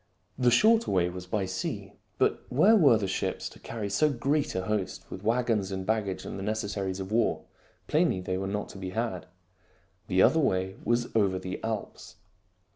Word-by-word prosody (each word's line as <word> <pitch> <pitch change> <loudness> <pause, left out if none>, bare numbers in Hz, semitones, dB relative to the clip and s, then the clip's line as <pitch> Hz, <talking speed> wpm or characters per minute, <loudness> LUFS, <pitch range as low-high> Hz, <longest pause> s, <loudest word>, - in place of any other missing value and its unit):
The 125 -1 +3
shorter 220 - +4
way 90 -2 +2
was 90 0 -8
by 100 0 -1
sea. 95 0 -4 0.2
But - - +2
where 175 - +5
were 140 - +6
the 100 -3 -2
ships 95 - -2
to - - -16
carry 110 -3 -5
so 100 +10 +2
great 140 +3 0
a 95 - -1
host 100 -1 -2
with 95 - -6
wagons 115 -3 +1
and 95 -1 -4
baggage 105 -3 -1
and - - -6
the - - -5
necessaries 100 -3 -2
of 95 +1 -6
war? 115 0 +1 0.4
Plainly 95 - +2
they 90 0 -3
were 95 - -3
not 105 +1 -3
to 95 - -10
be 95 -1 -4
had. 115 -6 -2 0.8
The 95 0 +4
other 160 - +5
way 95 -9 0
was 120 0 0
over 100 -4 +3
the 95 0 -6
Alps. 110 -2 -5
105 Hz, 190 wpm, -28 LUFS, 95-120 Hz, 0.8 s, were